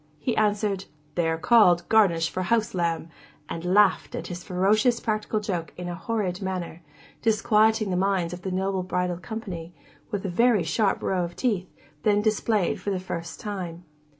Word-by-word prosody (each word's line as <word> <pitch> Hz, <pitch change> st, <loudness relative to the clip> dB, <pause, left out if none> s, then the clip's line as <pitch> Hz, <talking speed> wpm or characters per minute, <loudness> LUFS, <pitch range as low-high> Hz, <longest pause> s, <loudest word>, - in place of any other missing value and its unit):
he 235 Hz, -, -2 dB
answered, 205 Hz, -2 st, +1 dB, 0.3 s
'They 170 Hz, 0 st, +1 dB
are 160 Hz, -, 0 dB
called 175 Hz, -3 st, +5 dB
Garnish 175 Hz, -7 st, +4 dB
for 185 Hz, -, -2 dB
house 220 Hz, +4 st, +1 dB
lamb,' 170 Hz, -2 st, -1 dB, 0.4 s
and 170 Hz, 0 st, -5 dB
laughed 195 Hz, +2 st, +3 dB
at -, -, -4 dB
his 175 Hz, 0 st, -6 dB
ferocious 215 Hz, +6 st, +2 dB
practical 215 Hz, -1 st, -1 dB
joke 180 Hz, -6 st, -3 dB
in 180 Hz, 0 st, -5 dB
a 175 Hz, -, -3 dB
horrid 190 Hz, -1 st, -2 dB
manner, 180 Hz, -3 st, -4 dB, 0.4 s
disquieting 220 Hz, -1 st, +3 dB
the -, -, 0 dB
minds 185 Hz, -2 st, +1 dB
of 180 Hz, -, -7 dB
the 190 Hz, -, -4 dB
noble 190 Hz, +1 st, -1 dB
bridal 180 Hz, -1 st, -1 dB
company, 175 Hz, -4 st, -7 dB, 0.3 s
with 205 Hz, -1 st, -3 dB
a -, -, -1 dB
very 230 Hz, 0 st, +3 dB
sharp 195 Hz, +6 st, +1 dB
show -, -, -2 dB
of 170 Hz, 0 st, -5 dB
teeth, 205 Hz, -8 st, -1 dB, 0.3 s
then 205 Hz, +3 st, +3 dB
displayed 215 Hz, -2 st, +1 dB
for -, -, -3 dB
the 190 Hz, -2 st, -1 dB
first 170 Hz, -2 st, -6 dB
time. 180 Hz, -5 st, -5 dB
190 Hz, 175 wpm, -26 LUFS, 175-215 Hz, 0.4 s, called